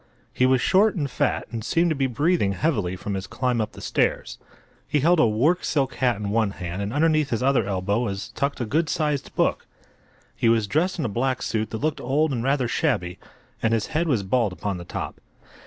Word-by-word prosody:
He 130 - +3
was 130 0 +3
short 205 +3 +4
and 150 -6 -1
fat, 125 - -1
and 115 -2 -4
seemed 165 +8 +2
to - - +1
be 135 -1 +1
breathing 140 - +1
heavily 105 - 0
from 100 +3 -5
his 95 0 -4
climb 125 +1 -1
up 110 - -4
the - - -11
stairs. - - -1 0.5
He 145 -1 +1
held 170 +3 +4
a 120 - +5
work 140 +12 +2
silk 135 -4 0
hat 125 -1 +1
in 100 -1 -4
one 110 -1 +2
hand 90 +2 -4
and 100 +1 -3
underneath 155 +1 +2
his 115 0 -1
other 130 -6 +2
elbow 100 +2 0
was 100 -4 -3
tucked 140 +1 -2
a 120 - -1
good 160 +8 0
sized 150 -3 -1
book. - - 0 0.7
He 115 - +2
was 115 -2 +3
dressed 160 - 0
in 155 - -2
a - - +1
black 125 +4 -1
suit 110 -1 -1
that 110 - -4
looked 155 +4 -2
old 145 +5 +1
and 115 -2 -2
rather 135 -1 +1
shabby, 90 -4 -1 0.4
and 115 0 +2
his 110 - -1
head 165 +2 +1
was 120 -10 +1
bald 105 0 +1
upon 100 0 -3
the 85 - -8
top. - - -6
125 Hz, 220 wpm, -24 LUFS, 105-150 Hz, 0.7 s, a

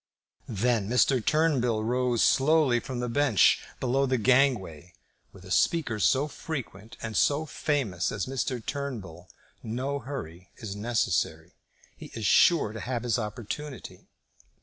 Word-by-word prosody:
Then 110 -1 0
Mr. 125 0 +3
Turnbull 130 -8 +1
rose 125 0 +1
slowly 140 -3 +3
from 125 0 -5
the 125 - -2
bench 125 -4 +3 0.2
below 135 +2 +1
the 130 0 +1
gangway. 105 - +1 0.4
With 95 -1 -15
a 95 - -10
speaker 125 - +1
so 135 +7 +2
frequent 120 -9 -7
and 110 -1 -5
so 145 +2 +2
famous 130 - -1
as 100 -4 -3
Mr. 130 -3 -3
Turnbull 105 - -6 0.3
no 130 +5 -3
hurry 95 - -8
is 105 -3 -6
necessary. 115 +2 -1 0.4
He - - -10
is 110 - -4
sure 155 - +4
to 115 - -6
have 120 0 -3
his 120 -1 0
opportunity. 120 +5 -7
120 Hz, 135 wpm, -27 LUFS, 105-135 Hz, 0.4 s, sure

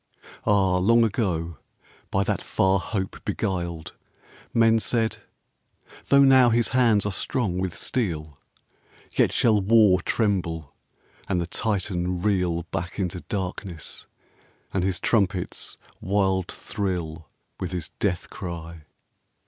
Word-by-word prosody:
Ah! 95 -3 +3
long 115 +6 +4
ago, 85 - -1 0.5
by 95 - +1
that - - -1
far 95 0 +2
hope 95 +1 -4
beguiled, 85 -4 -3 0.6
Men 115 -1 +4
said, 115 0 0 0.9
"Tho' 140 0 +6
now 130 -2 +7
his 120 0 +2
hands 115 -5 +3
are 105 - 0
strong 95 -2 -1
with 95 -2 -2
steel, 80 - -3 0.8
Yet - - +3
shall 110 -3 +3
War 100 -3 +5
tremble, 85 - -1 0.6
and 90 - +1
the 85 - -1
Titan 90 -3 -1
reel 90 -5 +1
Back 85 +2 -4
into 90 -2 -2
darkness, 95 -4 -5 0.7
and 95 - +1
his 95 -1 0
trumpets 95 -5 0 0.2
wild 95 -1 +1
Thrill 85 -6 -4 0.3
with 90 -1 -3
his 90 -4 -4
death 90 -4 -1
cry. 85 -3 -7
95 Hz, 115 wpm, -25 LUFS, 85-105 Hz, 0.9 s, now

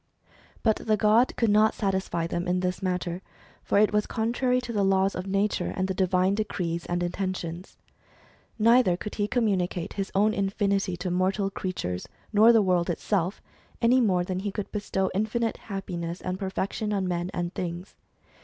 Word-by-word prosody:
But 220 -2 +3
the 215 -1 0
god 220 +4 +3
could 230 -3 +2
not 215 +1 +4
satisfy 190 -4 -1
them 175 +1 -3
in 180 0 +1
this 180 0 -2
matter; 180 -1 -2 0.4
for - - +1
it 210 0 +4
was 210 0 +1
contrary 245 +3 0
to 245 -1 -6
the 205 - +1
laws 195 0 +3
of 185 +1 -5
nature, 195 -1 0
and 190 0 0
the 190 - -1
divine 185 0 +2
decrees 180 -5 -2
and 175 0 -1
intentions. 180 -1 -4 0.8
ISTeither 230 -5 +5
could 210 - -6
he 205 -1 -1
communicate 190 -7 0
his 195 -1 -3
own 210 +2 +3
infinity 195 -2 0
to 180 0 -3
mortal 190 +2 +1
creatures, 90 - -4 0.3
nor 220 +3 +7
the 225 -3 +5
world 180 -2 +1
itself, 185 +2 -1 0.4
any 250 +2 +4
more 185 -6 +2
than 185 0 -3
he 200 +1 -3
could 200 +1 -5
bestow 190 -2 -1
infinite 220 +3 -1
happiness 180 -4 -5
and 185 +1 -4
perfection 200 +2 -2
on 195 -2 0
men 175 0 -2
and 175 -2 -3
things. 175 +1 -5
195 Hz, 170 wpm, -27 LUFS, 180-210 Hz, 0.8 s, nor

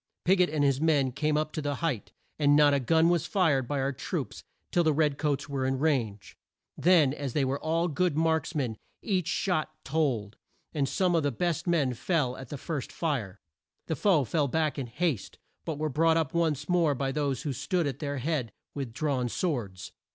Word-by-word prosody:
Pig 185 +1 +4
ot 180 - +3
and 150 -1 0
his 140 0 +2
men 145 -5 +3
came 150 +3 0
up 155 0 -1
the 145 -2 -2
height, 140 -7 -2 0.3
and 145 -1 +5
not 145 -1 +6
a 140 - +3
gun 160 +5 +3
was 175 -2 +1
fired 150 - +2
by 145 +1 -1
our 135 +1 0
troops 135 - -4 0.3
till 175 - +3
the 155 -2 +3
red 150 -2 +1
coats 145 -3 -1
were 140 -2 -2
in 130 0 0
range. 120 - -1 0.4
Then, 165 -6 +4
as 140 -4 -4
they 145 -3 +2
were 135 +2 -1
all 165 +2 0
good 170 0 0
marks 160 +1 +1
men 125 -7 -1 0.3
each 185 -5 0
shot 165 -4 -1
told, 130 -9 -1 0.4
and 140 -3 0
some 185 -2 +1
of 165 - +3
the 145 - +1
best 170 +6 -1
men 150 -7 +2
fell 130 -1 0
at 130 -2 -10
the 145 - -5
first 145 -1 -4
fire. 115 - -3 0.4
The 160 - -2
foe 160 -1 +3
fell 145 +3 0
back 155 +1 0
in 130 - -3
haste, 130 - -2 0.3
but 160 -3 -3
were 155 +1 -1
brought 160 +3 +3
up 160 -4 -1
once 155 -4 0
more 170 -5 +2
by 135 +1 -1
those 140 -2 -1
who 145 -4 -2
stood 175 +6 -1
at 140 -4 -3
their 145 -2 -3
head 130 -4 -2 0.2
with 135 -5 -5
drawn 130 -3 -1
swords. 115 - -3
145 Hz, 205 wpm, -28 LUFS, 135-160 Hz, 0.4 s, not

